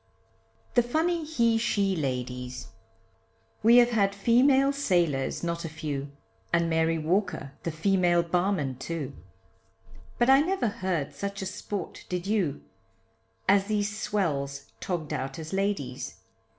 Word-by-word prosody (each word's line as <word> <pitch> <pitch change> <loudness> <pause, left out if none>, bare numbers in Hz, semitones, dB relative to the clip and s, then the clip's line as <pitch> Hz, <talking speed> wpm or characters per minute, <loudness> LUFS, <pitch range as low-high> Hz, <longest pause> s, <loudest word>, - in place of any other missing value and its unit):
THE 245 - +5
FUNNY 320 +7 0
HE 235 -7 +2
SHE 200 -4 +1
LADIES! 125 -3 -4 0.9
We 230 +3 +7
have 245 0 +6
had 200 -3 +2
female 265 +6 +4
sailors 175 - 0
not 170 0 -2
a 165 - -4
few, 145 -3 -4 0.4
And 170 0 +3
Mary 160 0 +2
Walker 180 -2 -1
the - - -2
female 175 +1 +2
barman, 170 -7 0
too, 150 -4 -4 1.0
But 240 - +3
I 270 +1 +7
never 355 - 0
heard 185 -7 -2
such 200 -1 -4
a - - -3
sport, 195 0 -5
did 180 0 -2
you, 195 -9 0 0.8
As 195 0 +5
these 205 -1 -1
swells 140 -10 -2
tog'd 160 -5 -3
out 135 -1 -3
as 160 +1 -7
ladies. 195 -11 -2
185 Hz, 130 wpm, -28 LUFS, 155-215 Hz, 1.0 s, We